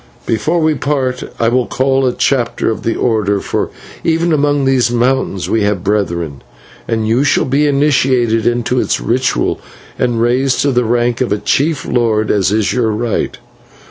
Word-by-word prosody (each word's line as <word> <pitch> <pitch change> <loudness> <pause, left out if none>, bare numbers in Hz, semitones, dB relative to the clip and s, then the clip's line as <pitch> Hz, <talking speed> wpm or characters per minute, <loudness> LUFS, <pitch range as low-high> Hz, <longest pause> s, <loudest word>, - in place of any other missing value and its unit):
"Before 155 +10 0
we 155 -1 +2
part 130 -2 -1 0.2
I 115 - +2
will 125 0 +1
call 135 0 +1
a - - +2
chapter 120 -3 0
of 110 - -5
the 115 - -1
order 105 -4 0
for - - -2 0.3
even 165 +1 +1
among 145 -1 +1
these 130 -3 +2
mountains 120 -5 0
we 115 - +1
have 100 -3 0
brethren 85 -8 -2 0.5
and 110 -1 -1
you 120 +5 +2
shall 145 - +2
be 140 +3 +1
initiated 130 -5 +2
into 120 +1 0
its - - 0
ritual 125 +3 0 0.4
and 120 -2 0
raised 125 +3 +1
to 140 - +2
the 125 -1 +1
rank 120 +1 0
of 125 - 0
a 105 - +2
chief 145 +8 0
lord, 110 -3 +1
as 100 -2 +1
is 105 -3 +1
your 120 -3 +1
right. 110 +1 -2
120 Hz, 175 wpm, -15 LUFS, 110-135 Hz, 0.5 s, we